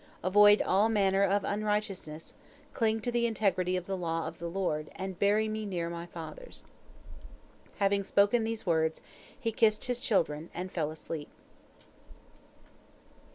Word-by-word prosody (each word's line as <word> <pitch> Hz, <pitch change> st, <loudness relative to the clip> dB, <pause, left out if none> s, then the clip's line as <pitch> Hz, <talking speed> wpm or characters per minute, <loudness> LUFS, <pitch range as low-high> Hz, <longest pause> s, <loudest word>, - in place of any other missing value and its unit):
Avoid 205 Hz, +3 st, +6 dB
all 200 Hz, +4 st, +3 dB
manner 195 Hz, -3 st, +2 dB
of 200 Hz, +1 st, +2 dB
unrighteousness, 205 Hz, -6 st, -3 dB, 0.4 s
cling 225 Hz, -2 st, +1 dB
to 245 Hz, -, -2 dB
the 235 Hz, 0 st, +2 dB
integrity 185 Hz, -5 st, +1 dB
of 180 Hz, -, -5 dB
the 195 Hz, -, -2 dB
law 165 Hz, -2 st, -2 dB
of -, -, -8 dB
the 170 Hz, -, -4 dB
Lord, 165 Hz, -4 st, -2 dB
and 190 Hz, -1 st, -6 dB
bury 210 Hz, +2 st, +3 dB
me 215 Hz, 0 st, -3 dB
near 175 Hz, -4 st, -3 dB
my 170 Hz, 0 st, -6 dB
fathers." 175 Hz, -, -9 dB, 1.1 s
Having 200 Hz, 0 st, +1 dB
spoken 205 Hz, +4 st, +3 dB
these 225 Hz, 0 st, -3 dB
words, 160 Hz, -2 st, +1 dB, 0.4 s
he 230 Hz, -4 st, -1 dB
kissed 215 Hz, -1 st, +2 dB
his 245 Hz, -1 st, -1 dB
children, 165 Hz, -, 0 dB
and 185 Hz, +1 st, -5 dB
fell 155 Hz, -4 st, -1 dB
asleep. 155 Hz, -1 st, -7 dB
195 Hz, 145 wpm, -30 LUFS, 170-215 Hz, 1.1 s, Avoid